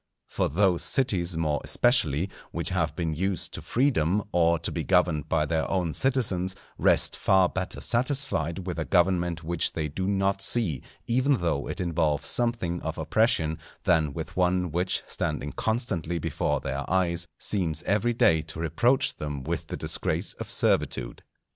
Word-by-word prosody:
For - - -1
those 90 +2 +2
cities, 90 -10 +1
more 75 -2 0
especially, 95 - +2 0.2
which - - -2
have - - -1
been 80 -2 -2
used 95 +2 -2
to - - -5
freedom 105 - +1
or 85 -1 +3
to 85 - -3
be 80 - -3
governed 85 -5 +1
by 75 -2 +2
their 80 +1 -1
own 90 -4 0
citizens, 100 -9 0 0.2
rest - - +4
far 95 -1 +3
better 95 +1 -4
satisfied 110 - 0
with 90 -2 -4
a 80 - -2
government 85 -2 +1
which 85 +1 -1
they 75 -2 -2
do 95 +6 -3
not 95 0 +1
see, 95 - +1 0.2
even 130 +4 +2
though 85 - -1
it - - -5
involve 80 -5 0
something 115 -8 0
of - - -4
oppression, 80 -9 +1 0.2
than 80 -4 +2
with - - -7
one 90 -1 +1
which 90 +3 -1
standing 75 -1 -3
constantly 100 -8 -1
before 80 - -1
their 70 +1 -3
eyes, 85 -2 +1
seems 85 -7 -1
every 110 +5 +1
day 80 -8 +4
to 80 0 -9
reproach 120 - +1
them 75 -3 -5
with 80 +3 -3
the - - -5
disgrace - - 0
of - - -6
servitude. - - 0
90 Hz, 160 wpm, -27 LUFS, 80-100 Hz, 0.2 s, rest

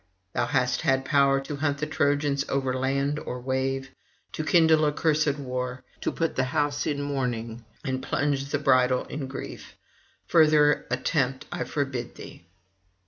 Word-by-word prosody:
Thou 120 -1 0
hast 125 -2 +1
had 135 -3 +1
power 140 -1 +4
to 140 +1 -6
hunt 145 -1 0
the 150 - -2
Trojans 145 -1 +1
over 135 -1 0
land 140 +3 0
or 125 - -5
wave, 135 +1 -2 0.4
to 155 - -4
kindle 160 -1 +4
accursed 150 -1 +1
war, 125 -2 -4 0.2
to - - -1
put 165 -1 -1
the 130 - +1
house 145 +3 0
in 145 -1 -1
mourning, 120 -5 -3 0.2
and 130 -1 -2
plunge 140 -1 0
the 140 +1 -1
bridal 130 -3 +3
in 140 -2 -5
grief: 135 - -8 0.5
further 150 -2 +4
attempt 130 +1 0
I 175 -1 -3
forbid 135 -5 -3
thee.' 85 - -12
140 Hz, 150 wpm, -26 LUFS, 130-145 Hz, 0.5 s, power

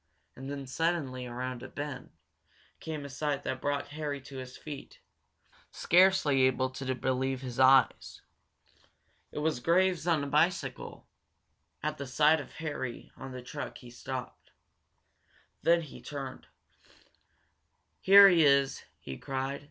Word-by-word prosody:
And 135 +1 -8
then, 140 -1 -5
suddenly, 135 -3 -2
around 125 0 -5
a 130 - -7
bend, 145 -3 -6 0.7
came 155 -3 -6
a - - -5
sight 140 +1 -2
that 130 - -3
brought 145 0 -2
Harry 150 -1 -4
to 135 +1 -10
his 130 -1 -8
feet, 145 -3 -9 0.7
scarcely 180 -7 +4
able 130 0 +2
to 130 0 -3
believe 130 +1 -1
his 125 -2 -6
eyes. 130 -1 +4 1.1
It - - -10
was 150 -3 0
Graves, 180 +3 +2
on 160 -4 +2
a - - -3
bicycle. 150 -3 -1 0.8
At 155 -1 -2
the 140 - -5
sight 150 +4 +4
of - - -9
Harry 145 -7 -5
on 135 0 -9
the 125 -1 -8
truck 145 +3 -6
he 120 -2 -13
stopped. 130 +1 -7 1.1
Then 170 0 +4
he 150 - -11
turned. 135 -3 -7 1.5
"Here 200 +1 +9
he 175 -4 +5
is!" 140 -1 +3 0.2
he 65 -1 -8
cried. 135 +1 -3
140 Hz, 135 wpm, -30 LUFS, 130-155 Hz, 1.5 s, Here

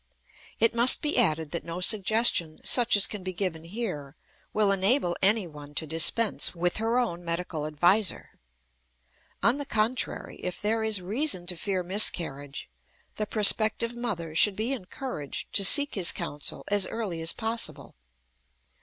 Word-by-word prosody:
It 230 +1 +2
must 235 +2 +4
be 300 - +1
added 160 -9 +1
that 170 - -5
no 170 +1 -7
suggestion 200 -4 +2
such 240 -4 +5
as 200 - +4
can 210 -3 -6
be 185 0 -6
given 175 -4 -4
here 170 - -6 0.4
will 210 -2 +1
enable 195 -1 +1
anyone 165 -8 -1
to 160 - -2
dispense 170 +8 +2
with 175 +1 -1
her 225 +2 -1
own 175 -9 -2
medical 170 -2 -4
adviser. 175 +7 0 1.1
On 235 +4 +3
the 290 - -3
contrary, 225 +2 -2
if 180 - -6
there 220 +2 -1
is 215 -4 0
reason 210 - -1
to 180 0 -3
fear 185 +1 -3
miscarriage, 165 -7 0 0.5
the 215 - -3
prospective 220 +2 +3
mother 180 -10 -5
should 200 +4 +5
be 225 +6 -2
encouraged 190 - -7
to 200 - +4
seek 285 +8 +6
his 185 -4 0
counsel 145 -1 -3
as 205 -2 +2
early 200 -8 -5
as 165 +1 +1
possible. 225 0 -5
195 Hz, 150 wpm, -26 LUFS, 170-225 Hz, 1.1 s, seek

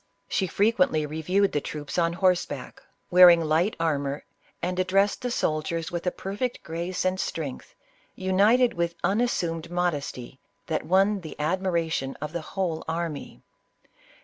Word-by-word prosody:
She 190 - 0
frequently 180 -6 +2
reviewed 180 +7 +1
the 145 - 0
troops 150 +4 -4
on 170 0 +2
horseback, 180 0 0 0.3
wearing 175 -1 +9
light 165 +5 +1
armor, 145 -3 -1 0.4
and 180 +1 -2
addressed 195 +2 +2
the 250 - -2
soldiers 165 -5 -1
with 175 +1 -4
a - - +3
perfect 205 +8 -4
grace 170 +3 -3
and 185 0 +1
strength, 155 -6 -5 0.4
united 205 +7 +3
with 170 0 -1
unassumed 175 -7 0
modesty, 145 -8 -3 0.3
that 160 - -2
won 195 +2 +3
the 155 -3 -9
admiration 165 -4 -1
of 150 +2 -5
the 170 - -2
whole 170 -1 -3
army. 165 -2 -4
170 Hz, 135 wpm, -26 LUFS, 160-190 Hz, 0.4 s, wearing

